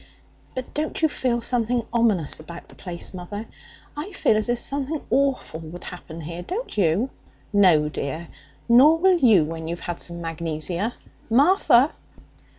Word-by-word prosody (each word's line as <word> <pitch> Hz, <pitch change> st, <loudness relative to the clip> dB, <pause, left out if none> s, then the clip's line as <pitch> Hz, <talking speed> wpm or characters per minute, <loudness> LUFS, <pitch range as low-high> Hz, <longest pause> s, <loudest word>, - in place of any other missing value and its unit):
'But 255 Hz, -1 st, -6 dB
don't 305 Hz, +1 st, -2 dB
you -, -, +7 dB
feel 250 Hz, -5 st, -1 dB
something 240 Hz, -1 st, 0 dB
ominous 215 Hz, -12 st, +2 dB
about 170 Hz, +2 st, -10 dB
the -, -, -14 dB
place, 175 Hz, 0 st, -5 dB
mother? 195 Hz, +4 st, -6 dB, 0.5 s
I 305 Hz, +8 st, -5 dB
feel 225 Hz, -, +2 dB
as 215 Hz, +2 st, 0 dB
if 240 Hz, -, +2 dB
something 280 Hz, +4 st, -1 dB
awful 270 Hz, -, +1 dB
would 165 Hz, +2 st, -9 dB
happen 170 Hz, -2 st, -8 dB
here, 170 Hz, +3 st, -6 dB
don't 415 Hz, -, -5 dB
you?' 200 Hz, +6 st, +2 dB, 0.4 s
'No, 180 Hz, -7 st, +5 dB
dear. 155 Hz, +2 st, -4 dB, 0.4 s
Nor 265 Hz, +7 st, +7 dB
will 365 Hz, +1 st, +4 dB
you 220 Hz, -, +5 dB
when 160 Hz, +1 st, -6 dB
you've 170 Hz, +1 st, -4 dB
had 175 Hz, -1 st, -4 dB
some 170 Hz, 0 st, -2 dB
magnesia. 165 Hz, +5 st, -2 dB, 0.3 s
Martha!' 275 Hz, -, +5 dB
210 Hz, 155 wpm, -24 LUFS, 170-260 Hz, 0.5 s, you